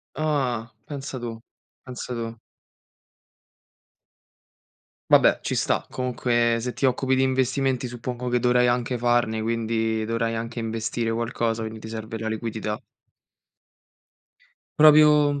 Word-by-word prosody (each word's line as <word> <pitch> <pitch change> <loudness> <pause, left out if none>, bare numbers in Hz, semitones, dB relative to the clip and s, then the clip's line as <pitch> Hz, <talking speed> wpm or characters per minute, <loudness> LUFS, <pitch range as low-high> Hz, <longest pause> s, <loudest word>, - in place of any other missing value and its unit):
Ah. 130 -7 -1
Pensa 140 -3 -6
tu, 115 -1 -5 0.5
pensa 125 -1 -6
tu. 115 -1 -5 2.7
Vabbè, - - +5
ci - - -2
sta. - - 0
Comunque 120 -2 +1
se 125 +2 -3
ti 135 - 0
occupi 130 +1 +1
di 130 - +2
investimenti 130 0 0
suppongo 120 +1 -5
che 125 - +2
dovrai 125 0 +3
anche 125 +1 0
farne, 120 -2 +1
quindi 110 -1 -1
dovrai 115 0 -1
anche 115 +1 -4
investire 115 +1 -2
qualcosa, 115 0 -1
quindi 110 0 -6
ti 110 - -8
serve 110 0 -6
la 110 0 -3
liquidità. 110 -1 -3 2.0
Proprio 150 -1 +6
120 Hz, 115 wpm, -24 LUFS, 115-130 Hz, 2.7 s, Proprio